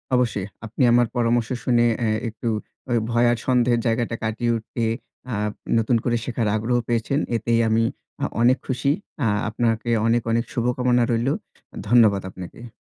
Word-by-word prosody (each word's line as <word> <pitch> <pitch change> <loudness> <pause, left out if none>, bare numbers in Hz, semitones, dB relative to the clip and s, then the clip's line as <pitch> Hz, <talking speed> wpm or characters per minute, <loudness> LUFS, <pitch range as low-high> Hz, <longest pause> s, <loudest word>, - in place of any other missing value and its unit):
অবশ্যই। 110 -6 0 0.2
আপনি 115 +5 -5
আমার 120 0 +4
পরামর্শ 120 -1 +1
শুনে 120 -1 +3
অ্যা 115 -2 +1 0.2
একটু 115 +2 -7 0.4
ঐ - - +2 0.2
ভয় 120 +1 +3
আর 120 - 0
সন্দেহের 120 -2 +3
জায়গাটা 115 0 0
কাটিয়ে 110 +2 0
উঠে, 115 +1 -4 0.5
আ 110 - -1 0.4
নতুন 115 +1 +2
করে 120 - +1
শেখার 115 -3 -1
আগ্রহ 115 +3 0
পেয়েছেন। 120 +4 0 0.2
এতেই 115 +1 +1
আমি 110 +1 +3 0.4
আ - - +3 0.2
অনেক 125 +3 +5
খুশি। 130 +1 +1 0.3
আ - - +3 0.2
আপনাকে 115 +1 -1 0.2
অনেক, 120 +1 +3
অনেক 115 +1 +1
শুভকামনা 125 0 +1
রইলো। 120 +4 +1 0.5
ধন্যবাদ 110 -5 +5
আপনাকে। 95 +6 -10
120 Hz, 155 wpm, -23 LUFS, 115-120 Hz, 0.5 s, অনেক